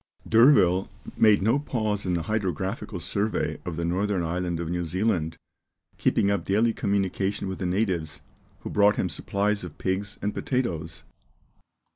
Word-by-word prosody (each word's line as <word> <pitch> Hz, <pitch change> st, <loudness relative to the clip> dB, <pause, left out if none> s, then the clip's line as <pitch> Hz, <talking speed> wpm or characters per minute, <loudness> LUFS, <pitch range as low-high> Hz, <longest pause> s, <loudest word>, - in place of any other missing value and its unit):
D'Urville 110 Hz, -7 st, +5 dB, 0.3 s
made 105 Hz, -3 st, +5 dB
no 115 Hz, +7 st, +3 dB
pause 110 Hz, -8 st, -2 dB
in 90 Hz, -, +1 dB
the 85 Hz, -, -1 dB
hydrographical 95 Hz, -1 st, -2 dB
survey 100 Hz, +5 st, -1 dB
of 90 Hz, -, -4 dB
the 85 Hz, +1 st, -2 dB
northern 95 Hz, +1 st, 0 dB
island 85 Hz, 0 st, -2 dB
of 85 Hz, -, -3 dB
New 90 Hz, +1 st, -1 dB
Zealand, 85 Hz, -2 st, -1 dB, 0.6 s
keeping 100 Hz, -, +2 dB
up 100 Hz, -4 st, 0 dB
daily 110 Hz, +5 st, +2 dB
communication 100 Hz, -1 st, -1 dB
with 95 Hz, -, -5 dB
the 90 Hz, -, -1 dB
natives, 90 Hz, -6 st, -1 dB, 0.4 s
who -, -, -6 dB
brought 105 Hz, 0 st, +4 dB
him -, -, -1 dB
supplies 100 Hz, 0 st, -1 dB
of 85 Hz, -4 st, -8 dB
pigs 95 Hz, +2 st, -2 dB
and 105 Hz, +1 st, -2 dB
potatoes. 85 Hz, -, -2 dB
95 Hz, 150 wpm, -26 LUFS, 90-105 Hz, 0.6 s, D'Urville